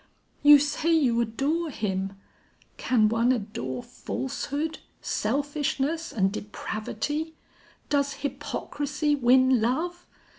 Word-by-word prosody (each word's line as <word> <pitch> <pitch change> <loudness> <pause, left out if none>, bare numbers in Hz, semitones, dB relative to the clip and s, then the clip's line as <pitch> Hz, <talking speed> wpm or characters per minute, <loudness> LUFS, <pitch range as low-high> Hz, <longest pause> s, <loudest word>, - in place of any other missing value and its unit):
You 290 0 +9
say 295 +3 0
you 255 -8 +3
adore 280 +9 -1
him: 195 -6 -2 0.6
can 225 -4 +3
one 230 +3 +2
adore 165 - -3
falsehood, 290 +4 -4 0.2
selfishness 290 +5 -1
and 195 -3 +1
depravity? 220 +9 -4 0.5
Does 280 -1 +1
hypocrisy 290 +1 -2
win 260 -1 +4
love? 335 +10 -1
275 Hz, 90 wpm, -26 LUFS, 225-295 Hz, 0.6 s, You